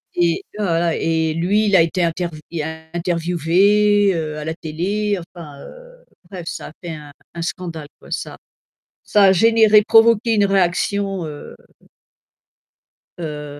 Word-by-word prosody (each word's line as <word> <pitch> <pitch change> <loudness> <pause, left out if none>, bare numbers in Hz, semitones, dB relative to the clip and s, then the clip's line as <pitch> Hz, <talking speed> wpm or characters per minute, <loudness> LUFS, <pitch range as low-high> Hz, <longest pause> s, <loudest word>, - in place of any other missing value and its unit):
Et 170 -1 +1
tu - - -14
vois, 200 - 0
voilà, 165 0 +1
et 160 -1 0
lui, 190 +7 +1
il 200 - +3
a 180 - +7
été 170 +2 0
intervi 170 -2 -3 0.5
interviewé, 180 +4 +2
heu, 155 -2 -4
à 150 - -6
la 160 - -3
télé 195 +6 -2 0.2
enfin, 150 -5 -11
heu, - - -15 0.2
bref, 180 -3 -8
ça - - -6
a - - -14
fait 175 - -6
un 150 -2 -9 0.2
un 170 - -5
scandale 165 -3 -6
quoi, - - -16
ça - - -5 0.7
ça 205 - +3
a 190 - +6
généré, 220 +2 +5
provoqué 230 0 +4
une 205 -2 +3
réaction, 195 0 0
heu 150 -1 -9 1.6
heu 150 -3 -7
175 Hz, 150 wpm, -19 LUFS, 165-205 Hz, 1.6 s, a